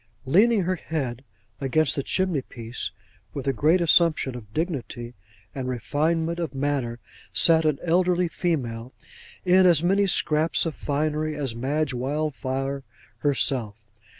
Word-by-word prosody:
Leaning 205 - +4
her 185 +1 -1
head 135 -7 -4 0.4
against 145 +2 +1
the 140 - 0
chimney 185 -1 0
piece, 120 -1 -6 0.5
with 140 - -4
a 135 - +2
great 155 +8 +3
assumption 165 -5 +3
of 110 -4 -10
dignity 125 -6 -4 0.4
and 130 -2 -4
refinement 160 +8 -1
of 160 -6 -3
manner, 135 -4 -1 0.4
sat 160 -1 +5
an 155 -3 +2
elderly 175 +1 +2
female, 130 -9 -3 0.5
in 185 +1 +6
as 170 -3 +4
many 195 +3 +3
scraps 160 -2 +2
of 165 - -2
finery 155 +2 -1
as 140 -5 -2
Madge 135 +4 -1
Wildfire 135 0 -2 0.4
herself. 130 -6 0
150 Hz, 130 wpm, -25 LUFS, 130-165 Hz, 0.5 s, in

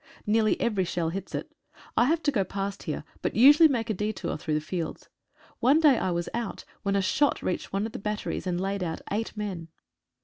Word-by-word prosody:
Nearly 215 0 +2
every 210 -5 +1
shell 170 -2 -1
hits 190 +3 -5
it. - - -5 0.4
I 235 - +5
have 325 +4 +1
to 290 - +2
go 205 -7 +1
past 195 +1 -4
here, 150 - -4 0.2
but - - -2
usually 295 +7 +8
make 230 -4 -1
a - - +1
detour 210 -3 -3
through 155 0 -2
the - - +2
fields. 165 +1 -5 0.5
One 275 +6 +5
day 295 -6 +5
I - - 0
was 170 -1 -1
out 235 0 -4 0.2
when 200 0 0
a 195 - +2
shot 275 +9 +2
reached 180 - -2
one 195 +2 0
of 225 - -5
the - - -6
batteries 210 -2 -3
and 175 -1 0
laid 195 +1 -2
out 165 -3 -3
eight 220 +2 -2
men. 190 -6 -4
200 Hz, 215 wpm, -27 LUFS, 180-230 Hz, 0.5 s, usually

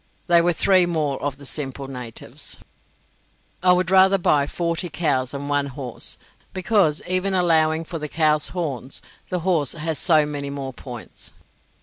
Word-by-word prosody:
They 170 -1 +5
were 175 +1 +3
three 185 +1 +3
more 155 -5 -1
of 140 -2 -3
the 140 - -13
simple 135 -1 -4
natives. 125 -4 -5 1.0
I 180 0 +5
would 180 0 0
rather 190 +1 +6
buy 145 -6 +2
forty 170 +2 -2
cows 135 -8 0
than 140 0 -5
one 145 -1 +1
horse, 130 -3 -4 0.4
because, 185 -5 +2
even 185 +2 +1
allowing 160 -2 +3
for 165 0 -5
the 150 0 -5
cow's 155 -1 +2
horns, 140 -7 -4 0.3
the 180 -2 -2
horse 165 -6 +1
has 160 -1 -2
so 155 -4 +4
many 145 -1 -4
more 135 -2 -5
points. 120 -1 -9
155 Hz, 155 wpm, -22 LUFS, 140-175 Hz, 1.0 s, rather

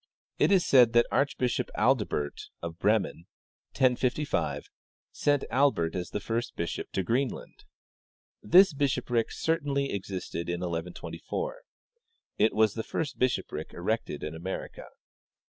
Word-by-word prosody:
It - - +4
is 190 -3 +4
said 125 -4 +6
that 120 0 +5
Archbishop 125 -3 0
Adalbert, 105 - 0
of 85 0 -6
Bremen 100 -4 +1 0.5
(1055), 130 +2 +1 0.5
sent 145 -1 +1
Albert 125 -11 +2
as 90 -1 -4
the - - -3
first 115 +3 -3
bishop 85 - -3
to 95 - 0
Greenland. 125 +8 -2 0.8
This 185 - +6
bishopric 130 -4 0
certainly 145 -4 0
ex 100 -1 -4
isted 85 -3 -4
in 90 0 -2
1124. 90 - -4 0.8
It 110 +2 +4
was 110 -1 +4
the 115 - -3
first 145 +5 -4
bishopric 130 -1 -1
erected - - -2
in 75 - -4
America. 85 +4 -6
115 Hz, 125 wpm, -28 LUFS, 90-140 Hz, 0.8 s, said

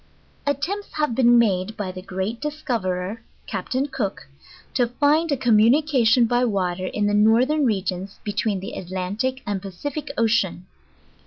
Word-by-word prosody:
Attempts 320 +9 -2
have 300 -5 0
been 240 0 +5
made, 205 -2 +1
by 195 -3 -3
the 185 0 -8
great 195 +5 -4
discoverer, 225 -9 -3 0.2
Cap - - -5
ta'n 260 +2 +1
Cook, 220 - -4 0.5
to 245 -2 +2
find 295 +6 +2
a 280 - +2
communication 240 +1 +4
by 245 +2 +2
water 185 -5 -1
in 210 +2 -1
the 205 - +1
northern 245 +8 +4
regions 190 -2 -2
between 205 -2 -1
the 195 - -6
Atlantic 190 +8 -3
and 200 -2 -2
Pacific 255 - -5
Ocean. 215 -6 +1
225 Hz, 145 wpm, -23 LUFS, 190-260 Hz, 0.5 s, been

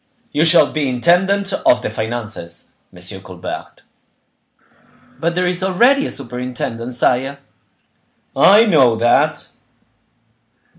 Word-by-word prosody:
"You 150 +3 +1
shall 170 +1 +4
be 150 -3 -1
intendant 190 +9 +1
of 125 - +2
the - - -3
finances, 110 -7 -6 0.2
M. 95 +2 -8
Colbert." 95 -2 -9 1.4
"But 170 +2 -1
there 180 0 0
is 180 +1 -1
already 240 +10 +2
a - - -7
superintendent, 125 -1 -6
sire." 130 +3 0 1.0
"I 210 +4 +6
know 135 - +4
that." 120 +1 +1
130 Hz, 105 wpm, -17 LUFS, 115-180 Hz, 1.4 s, I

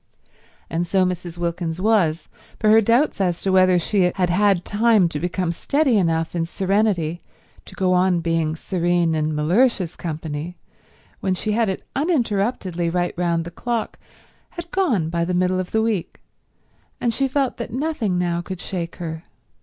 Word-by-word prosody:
And 170 +1 -2
so 190 +1 +2
Mrs. 180 -1 -4
Wilkins 170 -1 -3
was; 185 -7 +2 0.3
for 215 - +3
her 220 +1 +7
doubts 235 +2 +2
as 180 -2 0
to 195 - +1
whether 185 -1 +5
she 180 +1 +2
had 180 -2 +1
had 195 -1 +2
time 215 -3 +3
to 150 - -4
become 175 0 -1
steady 275 - +1
enough 165 -4 +1
in 165 -1 -1
serenity 190 -3 0 0.4
to - - -12
go 185 -1 +1
on 180 -1 +3
being 165 -2 0
serene 175 -1 0
in 155 -1 -1
Mellersh's 180 +3 +2
company 160 +1 -5 0.6
when 190 -1 0
she 215 +4 -2
had 220 0 +1
it 190 - -4
uninterruptedly 210 - 0
right 175 +1 -1
round 170 -2 0
the 170 - -7
clock, 235 +4 -3 0.5
had 345 -1 -9
gone 240 - +1
by 170 0 -1
the 180 +1 -1
middle 185 +1 +1
of 185 - -3
the 220 0 +1
week, 215 -6 -2 0.8
and 235 -1 0
she 270 +4 +1
felt 270 -1 -1
that 235 -2 -5
nothing 255 - -1
now 175 -1 0
could 185 +1 -7
shake 175 -3 -4
her. 160 -1 -6
180 Hz, 170 wpm, -22 LUFS, 170-215 Hz, 0.8 s, her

